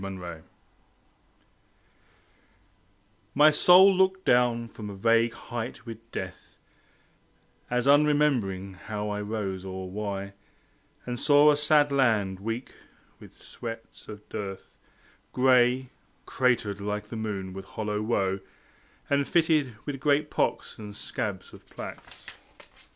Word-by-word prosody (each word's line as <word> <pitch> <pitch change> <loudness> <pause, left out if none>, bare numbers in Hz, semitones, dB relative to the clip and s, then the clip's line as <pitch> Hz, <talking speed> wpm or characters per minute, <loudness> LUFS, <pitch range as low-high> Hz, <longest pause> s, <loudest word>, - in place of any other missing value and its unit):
The 100 - -5
Show 90 -4 -8 2.9
My 150 +2 +7
soul 180 +5 +7
looked 190 0 +2
down 120 -1 +3
from 105 -2 -9
a 100 - -7
vague 115 +3 +2
height 120 0 -6
with 115 0 -10
Death, - - -7 1.1
As 125 0 0
unremembering 140 -10 +2
how 105 0 -3
I 105 0 -3
rose 105 -3 -4
or 95 -1 -6
why, 100 -1 -4 0.7
And 120 -1 -4
saw 145 0 +6
a - - +3
sad 150 0 +3
land, 110 -8 +1
weak 115 +5 -5 0.5
with - - -14
sweats 115 -1 -9
of 105 -1 -10
dearth, 95 -2 -6 0.7
Gray, 125 0 +3 0.3
cratered 110 -6 0
like 105 +1 -4
the 115 - -6
moon 100 -4 -4
with 95 0 -8
hollow 105 -1 -3
woe, 100 -3 0 0.7
And 140 0 +1
fitted 155 -7 +2
with 140 -2 -4
great 150 +1 +1
pocks - - -1
and 105 -1 -9
scabs 95 -3 -5
of - - -14
plaques. - - -10
115 Hz, 120 wpm, -27 LUFS, 100-140 Hz, 2.9 s, My